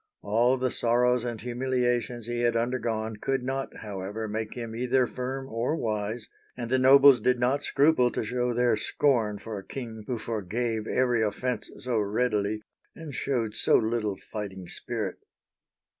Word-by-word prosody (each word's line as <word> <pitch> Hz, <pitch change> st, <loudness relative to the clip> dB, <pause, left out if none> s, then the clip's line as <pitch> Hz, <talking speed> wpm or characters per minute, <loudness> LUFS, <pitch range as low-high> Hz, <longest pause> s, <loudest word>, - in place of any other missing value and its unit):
All 120 Hz, +5 st, +3 dB
the 130 Hz, -1 st, 0 dB
sorrows 120 Hz, +1 st, +2 dB
and 120 Hz, -2 st, -4 dB
humiliations 125 Hz, -1 st, -1 dB
he 120 Hz, 0 st, -3 dB
had 120 Hz, -1 st, +2 dB
undergone 115 Hz, -2 st, -1 dB
could 135 Hz, +4 st, -1 dB
not, 135 Hz, +1 st, -4 dB
however, 105 Hz, +1 st, -5 dB
make 110 Hz, +1 st, -4 dB
him 115 Hz, -2 st, -5 dB
either 125 Hz, +2 st, +2 dB
firm 130 Hz, +2 st, -4 dB
or 120 Hz, +5 st, -1 dB
wise; 110 Hz, -2 st, -2 dB, 0.3 s
and 120 Hz, -1 st, -5 dB
the 130 Hz, -, +4 dB
nobles 135 Hz, 0 st, +8 dB
did 125 Hz, +3 st, +2 dB
not 130 Hz, +4 st, +2 dB
scruple 140 Hz, -4 st, +4 dB
to -, -, -2 dB
show 125 Hz, +2 st, -1 dB
their 120 Hz, -1 st, +3 dB
scorn 110 Hz, -2 st, +1 dB
for 105 Hz, 0 st, -6 dB
a -, -, -11 dB
king 115 Hz, -4 st, -7 dB
who 125 Hz, -, -1 dB
forgave 110 Hz, +1 st, -2 dB
every 125 Hz, -3 st, +2 dB
offense 125 Hz, +4 st, -1 dB
so 125 Hz, -3 st, -1 dB
readily, 105 Hz, 0 st, 0 dB, 0.3 s
and 160 Hz, -3 st, -8 dB
showed 120 Hz, -4 st, -1 dB
so -, -, +3 dB
little 110 Hz, -3 st, 0 dB
fighting 95 Hz, -3 st, -7 dB
spirit. -, -, -4 dB
120 Hz, 160 wpm, -27 LUFS, 110-125 Hz, 0.3 s, nobles